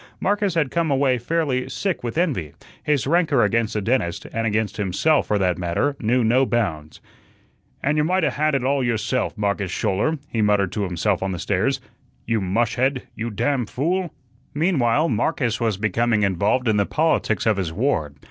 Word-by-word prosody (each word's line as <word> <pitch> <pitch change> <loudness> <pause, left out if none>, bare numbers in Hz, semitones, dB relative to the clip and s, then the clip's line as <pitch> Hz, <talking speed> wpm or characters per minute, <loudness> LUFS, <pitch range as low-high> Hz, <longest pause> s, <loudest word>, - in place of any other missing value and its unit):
Marcus 205 -2 0
had 150 -5 +1
come 170 -2 0
away 135 -2 +2
fairly 135 -1 -1
sick 190 -9 -2
with 120 +4 -4
envy; 125 - -1 0.3
his 145 -4 0
rancor 155 -4 +3
against 115 -2 0
the 105 - 0
dentist 105 -7 -1
and 115 0 -1
against 105 -1 -1
himself, 105 - +1
for 105 - +1
that 90 -3 0
matter 90 +12 0
knew 120 +2 +1
no 120 +4 +3
bounds. 95 - -2 0.8
"And 150 +2 +1
you - - +3
might 180 +3 +1
'a' - - +2
had 155 0 +1
it 135 - 0
all 135 +1 +1
yourself, 115 0 -1
Marcus 100 -2 -1
Schouler," 105 - 0
he 115 - -2
muttered 105 -3 +2
to 105 -2 -2
himself 90 +1 -1
on 95 0 -2
the - - -4
stairs. - - 0 0.5
"You 115 -2 0
mushhead, 120 +7 0
you 115 +1 -3
damn 125 +3 -1
fool!" 170 - -1 0.4
Meanwhile, 150 -3 +2
Marcus 125 -9 0
was 110 -4 0
becoming 110 +2 +1
involved 100 +6 +1
in 110 -2 +3
the 100 - +1
politics 155 -8 +1
of 110 -3 +2
his 90 -4 -2
ward. 80 - -1
120 Hz, 180 wpm, -22 LUFS, 105-145 Hz, 0.8 s, rancor